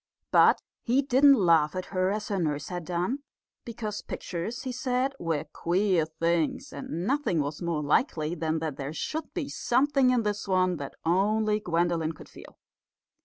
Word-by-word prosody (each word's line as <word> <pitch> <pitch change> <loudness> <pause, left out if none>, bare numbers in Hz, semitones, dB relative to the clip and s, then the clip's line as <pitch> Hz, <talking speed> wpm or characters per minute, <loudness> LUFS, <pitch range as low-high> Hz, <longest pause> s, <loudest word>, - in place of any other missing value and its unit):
But - - +5 0.2
he 255 +4 +2
didn't 275 +2 +6
laugh 165 - +3
at 185 - -3
her 185 0 +2
as 210 +1 -3
her 200 -2 0
nurse 150 -3 -2
had 175 -2 -5
done, 180 - -1 0.4
because 215 -3 -5
pictures, 190 +9 -5
he 260 - -3
said, 255 +1 -1
were 165 -3 -1
queer 175 +2 0
things; 165 0 -1
and 160 +5 -5
nothing 275 - +1
was 145 +1 -3
more 170 -3 -1
likely 155 - +1
than 160 -1 -1
that 155 -4 -3
there 140 +1 -5
should 315 - -4
be 330 -6 -2
something 270 +1 +2
in 250 -2 +2
this 205 -1 -2
one 185 -2 +2
that 140 -2 -7
only 210 +5 +2
Gwendolen 170 -3 0
could - - -14
feel. - - -14
185 Hz, 170 wpm, -28 LUFS, 160-235 Hz, 0.4 s, didn't